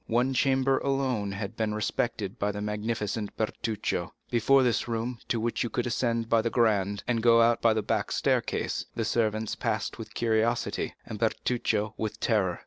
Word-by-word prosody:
One 125 +3 +2
chamber 135 +1 +2
alone 130 -7 0
had 100 +2 -5
been 110 -2 -1
respected 105 -1 -2
by 105 +1 +1
the 105 - -4
magnificent 105 0 -3
Bertuccio. 110 0 -2 0.2
Before 130 +3 +4
this 120 -1 +1
room, 115 +1 -2
to 115 - 0
which 115 +1 -1
you 120 - 0
could 125 - -1
ascend 115 -1 0
by 115 0 +3
the 115 - 0
grand, 105 -4 +1
and 115 -2 +1
go 115 0 +6
out 115 0 +3
by 115 -1 +5
the 110 - 0
back - - -1
staircase, - - 0
the 115 - -1
servants 110 -1 0
passed - - -2
with - - -9
curiosity, 115 +1 0
and 105 - -7
Bertuccio 110 -2 0
with 110 0 -3
terror. 95 -6 +1
115 Hz, 175 wpm, -28 LUFS, 105-120 Hz, 0.2 s, go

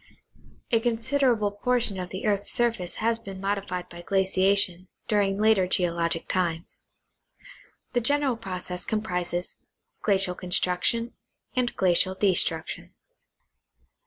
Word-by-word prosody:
A 230 - +4
considerable 235 -1 +1
portion 225 -1 +1
of 180 -1 -5
the 190 - -5
earth's 205 -1 +1
surface 230 -7 +1
has 225 +1 +1
been 195 -4 -8
modified 195 -2 -2
by 175 -1 -10
glaciation 190 -1 +1 0.2
during 200 -2 +2
later 215 -4 +4
geologic 170 -2 0
times. 170 -2 -2 1.1
The 245 - +2
general 285 +1 +2
process 185 -5 -5
compi'ises 180 -5 -2 0.5
glacial 195 -3 +2
con 180 0 -9
struction 185 +7 +1 0.4
and 250 -1 0
glacial 185 0 +2
destruction. 175 -5 0
195 Hz, 110 wpm, -26 LUFS, 180-225 Hz, 1.1 s, A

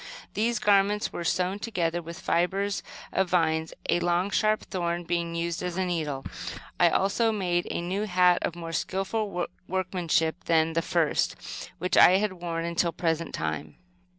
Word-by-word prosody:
These 235 +3 +1
garments 205 0 +2
were 175 - -4
sewn 185 +3 0
together 175 -6 -1
with 170 +1 -8
fibres 195 +4 0 0.3
of 190 -1 +1
vines, 160 -2 +1 0.2
a 175 - +3
long, 175 +3 +1
sharp 215 0 +2
thorn 175 -2 -2
being 170 -1 -2
used 170 0 -2
as 180 -1 -3
a 190 - +1
needle. 155 -6 -2 0.5
I 175 - +6
also 200 +6 +2
made 180 -4 0
a - - -2
new 190 +4 -2
hat, 180 -2 +4
of 170 - -2
more 165 -1 -6
skillful 195 +1 -1 0.2
workmanship 180 -3 0
than 165 0 +3
the 165 - +1
first, 165 -2 +1 0.4
which 180 +1 0
I 180 - +9
had 205 -1 0
worn 170 -2 -3
until 170 0 +1
the - - -29
present 165 -1 -1
time. 80 -1 -3
175 Hz, 165 wpm, -27 LUFS, 170-190 Hz, 0.5 s, I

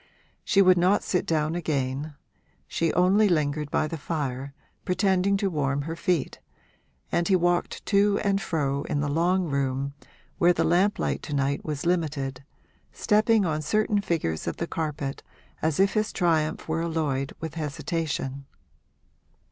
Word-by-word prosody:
She 195 - +4
would 185 -1 +5
not 185 +4 +3
sit 180 - -1
down 155 -1 +1
again; 145 -3 -2 0.5
she 165 -1 0
only 195 +4 +4
lingered 150 -3 0
by 155 - +1
the 160 0 -5
fire, 140 -4 -3 0.3
pretending 190 +1 +2
to 200 0 0
warm 140 -2 0
her 165 +2 -4
feet, 170 -2 -1 0.7
and 170 - +1
he 195 - +4
walked 175 0 0
to 200 0 +3
and 200 -1 +1
fro 140 -5 -1
in 145 - -1
the 145 - -1
long 175 +5 +2
room, 140 -2 -1 0.5
where 175 +1 +5
the - - 0
lamp 185 +5 +3
light - - -1
to 150 - -4
night 140 0 0
was 150 -1 -4
limited, 145 -6 -1 0.5
stepping 215 -1 +3
on 155 -2 -1
certain 210 +5 +1
figures 160 - -2
of - - -3
the 170 - -2
carpet 150 -4 -4 0.4
as 160 0 0
if 195 0 +4
his 215 0 0
triumph 160 -4 0
were 160 +1 -1
alloyed 150 -5 -1
with 160 -2 -5
hesitation. 145 -3 -3
160 Hz, 155 wpm, -26 LUFS, 145-180 Hz, 0.7 s, would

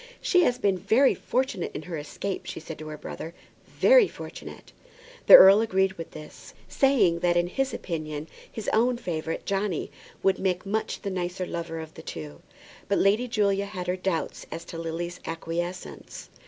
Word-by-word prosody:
"She 360 - +3
has 245 - +1
been 195 -6 +1
very 225 +9 +4
fortunate 255 -8 -2
in - - -5
her 170 +1 -6
escape," 160 +6 -5
she - - -5
said 160 -1 -9
to 155 - -8
her 155 0 -7
brother; 165 +3 -8 0.3
"very - - +5
fortunate." - - -10 0.6
The - - +12
earl 195 +3 +9
agreed 190 -3 +1
with 165 -2 -8
this, 155 -1 -12
saying 215 -12 +3
that 175 0 +2
in 175 - +3
his 265 +9 -1
opinion 155 -3 -5 0.2
his 220 - -7
own 240 +2 +3
favourite 165 -7 -4
Johnny 195 -3 -2 0.3
would 195 - +2
make 185 0 -1
much 215 +3 -2
the 200 - -3
nicer 180 0 -3
lover 170 -1 -5
of 160 -1 -8
the 160 - -10
two. 75 - -8 0.5
But 200 - +1
Lady 210 +6 +3
Julia 200 -4 +1
had 185 -3 -6
her 180 0 0
doubts 185 -2 -3
as 165 - -6
to 165 - -7
Lily's 170 +2 -4
acquiescence. 170 +2 -5
180 Hz, 175 wpm, -26 LUFS, 165-205 Hz, 0.6 s, The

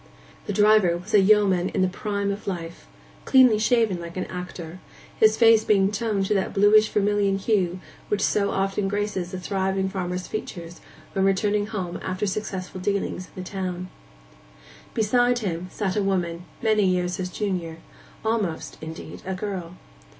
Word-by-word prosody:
The - - -1
driver 205 -4 +4
was 185 +5 -10
a 210 - +7
yeoman 195 -3 +4
in - - 0
the - - +3
prime 200 +1 -2
of 200 +1 -6
life, 170 -3 -5 0.4
cleanly 255 -5 +5
shaven 220 -4 +2
like 170 +1 -8
an 185 - -2
actor, 180 -1 -7 0.4
his 220 0 +5
face 225 -2 +6
being 195 -2 +3
toned 210 -2 -1
to 200 - +1
that 195 -2 -1
bluish 210 +2 +5
vermilion 205 -1 +1
hue 190 -3 0 0.3
which 205 -1 0
so 200 -1 +2
often 195 +1 0
graces 200 -3 -2
a 185 - -4
thriving 190 0 -1
farmer's 180 -1 -3
features 175 -5 -7 0.3
when 190 - +1
returning 205 +1 +1
home 190 -5 -4
after 185 +2 -2
successful 190 -2 -4
dealings 195 -2 -2
in 185 - -6
the - - -9
town. 185 -2 -4 1.1
Beside 245 +3 +3
him 180 -6 -3
sat 195 -2 -2
a 210 - +1
woman, 180 -3 -1 0.2
many 215 -2 +3
years 180 -1 0
his 185 -1 -3
junior—almost, 180 +1 -4
indeed, 160 +2 -8
a 190 0 -3
girl. 185 -3 -5
195 Hz, 155 wpm, -24 LUFS, 180-210 Hz, 1.1 s, a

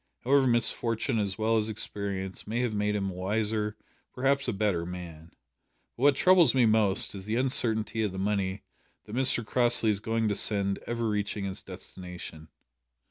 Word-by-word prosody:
However, 135 +1 +3
misfortune 115 0 +1
as 100 -2 -2
well 110 +1 +1
as 110 0 0
experience 100 -3 -4
may 115 +3 -2
have 120 -3 -1
made 105 0 -1
him 100 -2 -2
a - - -9
wiser, 105 +3 -2 0.4
perhaps 140 +2 0
a - - 0
better, 100 -4 -1
man. 85 -2 -9 0.7
But - - -12
what 140 0 +4
troubles 170 -4 +4
me 125 -2 +4
most 110 -3 +2
is 95 -2 -8
the 110 +2 -2
uncertainty 115 -3 +1
of 105 -3 -1
the 95 - -8
money 95 -1 -2 0.4
that 110 - -8
Mr 125 -3 +2
Crossley 120 -1 +5
is 100 - -1
going 115 +1 -1
to 105 - 0
send 100 -1 +2
ever 115 -1 -2
reaching 105 -1 -2
its 95 +1 -5
destination." 90 -4 -10
105 Hz, 175 wpm, -28 LUFS, 95-115 Hz, 0.7 s, Crossley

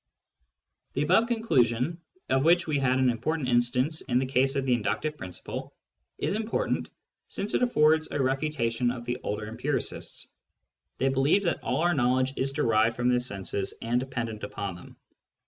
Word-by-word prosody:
The - - 0
above 185 +9 +4
conclusion, 165 - +1 0.3
of 135 0 +2
which 170 +2 +4
we 150 -3 0
had 130 -1 +2
an 125 -3 +1 0.3
instance 125 +5 +1
in 125 -2 0
the 130 - +2
case 135 +1 +2
of 135 -1 0
the 130 - +3
inductive 150 +6 -1
principle, 90 -10 -7 0.4
is - - -1
important, 220 +2 -1 0.4
since 205 +2 -3
it - - +2
affords 155 -9 +3
a - - -3
refutation 130 -3 0
of 120 -1 -5
the 120 +1 -2
older 105 +1 -3
empiricists. 110 +2 -3 0.7
They 135 - +2
believed 135 +9 +2
that 170 - 0
all - - -1
our 175 +1 +3
knowledge 130 -1 +2
is 135 +1 0
derived 115 -3 +2
from 125 +1 +1
the 125 0 +3
senses 100 -4 -3
and 120 +2 0
dependent 120 -4 -4
upon 100 -1 -4
them. 90 - -13
130 Hz, 165 wpm, -27 LUFS, 120-150 Hz, 0.7 s, above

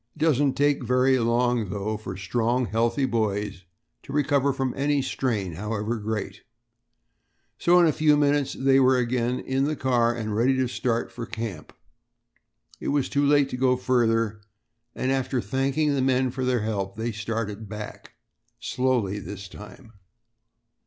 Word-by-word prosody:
It - - -17
doesn't 145 -3 +3
take 145 0 +2
very 130 +1 +3
long, 120 -2 +1
though, 105 +2 -2
for 100 -3 -7
strong, 120 +5 0
healthy 115 +6 +1
boys 105 -5 -2 0.4
to - - -11
recover 140 -1 +2
from 135 -1 -2
any 145 +1 +1
strain, 110 -9 -2
however 105 +5 -3
great; 105 -2 -4 1.2
so 175 +1 +5
in 175 - +6
a 160 - +4
few 150 -1 +3
minutes 145 -1 +2
they 135 0 +4
were 130 0 +4
again 125 0 0
in 135 +1 -1
the 155 +1 -1
car 120 -4 +2
and 110 -3 -3
ready 130 +4 +2
to 130 -1 +1
start 120 -1 -2
for 120 -1 -7
camp. 110 -9 -6 1.1
It - - -6
was 140 -2 +1
too 145 - +1
late 145 -1 +4
to 125 - -4
go 125 0 +2
further, 115 -4 +1 0.5
and 130 - -1
after 130 -1 0
thanking 135 +7 0
the 135 - 0
men 130 -1 +2
for 130 0 -3
their 125 -2 +1
help 100 -3 -3
they 115 +2 -2
started 110 -1 -4
back 105 0 -8 0.5
slowly 120 -6 0
this 100 0 -8
time. 105 +4 -13
125 Hz, 160 wpm, -25 LUFS, 110-135 Hz, 1.2 s, in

